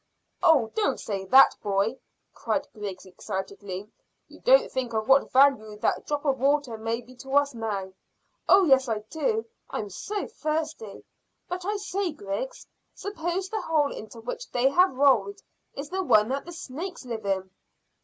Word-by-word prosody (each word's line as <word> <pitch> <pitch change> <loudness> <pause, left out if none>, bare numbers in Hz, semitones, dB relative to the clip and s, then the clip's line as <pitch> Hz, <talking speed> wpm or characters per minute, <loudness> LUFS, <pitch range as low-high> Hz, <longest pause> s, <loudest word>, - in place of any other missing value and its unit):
"Oh, 300 -11 +4
don't 430 -2 0
say 195 -2 -4
that, 265 +8 +7
boy!" 205 +5 0 0.3
cried - - -2
Griggs 200 -4 -6
excitedly. 190 +1 -6 0.4
"You - - -16
don't - - +5
think 255 -3 -3
of 220 0 -1
what 270 +1 +4
value 255 -6 +4
that - - -1
drop 295 0 -2
of 270 -3 +1
water 280 -2 +1
may 225 +2 -3
be 250 +1 -16
to 270 +2 -5
us 285 -1 +3
now." 205 -5 -4 0.6
"Oh 390 0 +7
yes, 265 -5 +4
I 215 -2 -1
do. 445 +7 0 0.2
I'm 210 -2 -4
so 410 - -4
thirsty; 305 -9 -4 0.4
but 360 0 -5
I 415 +1 -1
say, 395 -3 -2
Griggs, 295 - -5 0.3
suppose 370 0 -3
the 435 0 -2
hole 300 -3 +1
into 220 +2 -9
which - - -6
they 250 +2 +2
have 360 +1 +4
rolled 240 -8 +3 0.4
is 285 +3 -6
the 380 +1 -1
one 215 - +4
that 275 +2 -2
the 345 - -8
snakes 335 +1 -7
live 225 -4 -5
in." 190 -1 -1
265 Hz, 165 wpm, -26 LUFS, 215-330 Hz, 0.6 s, that